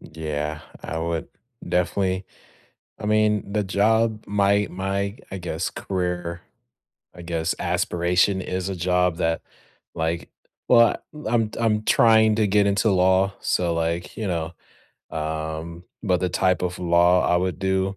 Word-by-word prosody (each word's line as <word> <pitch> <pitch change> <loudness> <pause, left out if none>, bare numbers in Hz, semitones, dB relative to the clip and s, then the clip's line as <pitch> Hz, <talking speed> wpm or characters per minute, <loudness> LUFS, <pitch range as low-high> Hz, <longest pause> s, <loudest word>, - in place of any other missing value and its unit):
Yeah, 75 -1 -4 0.2
I 80 - -4
would 85 0 -3 0.4
definitely 95 +2 0 0.7
I 105 - -5
mean, 105 -1 +2
the 105 -1 0
job 110 +3 +1
my 100 0 +2
my, 100 +3 -2
I 95 - -5
guess, 85 -1 -3
career 90 -2 -3 0.7
I 85 - -10
guess, 85 -1 -1
aspiration 90 +3 +1
is 95 0 -3
a 95 - -3
job 90 0 +1
that, 80 -1 0 0.5
like 80 +1 -2 0.4
well, 115 -2 +6 0.2
l 150 - -9
I'm 115 -2 +1
I'm 110 -2 +1
trying 110 -1 +5
to 110 -2 +2
get 100 +1 +3
into 100 +2 +2
law. 95 +1 +3
So, 85 -2 0
like, 85 +1 -2
you 110 - -3
know, 85 -2 -2 0.6
um, 80 +2 -4 0.2
but 90 -4 +1
the 90 - +1
type 90 +1 +1
of 90 0 -2
law 90 +1 +4
I 90 - +3
would 90 -3 -1
do, 95 0 0
90 Hz, 145 wpm, -23 LUFS, 85-100 Hz, 0.7 s, well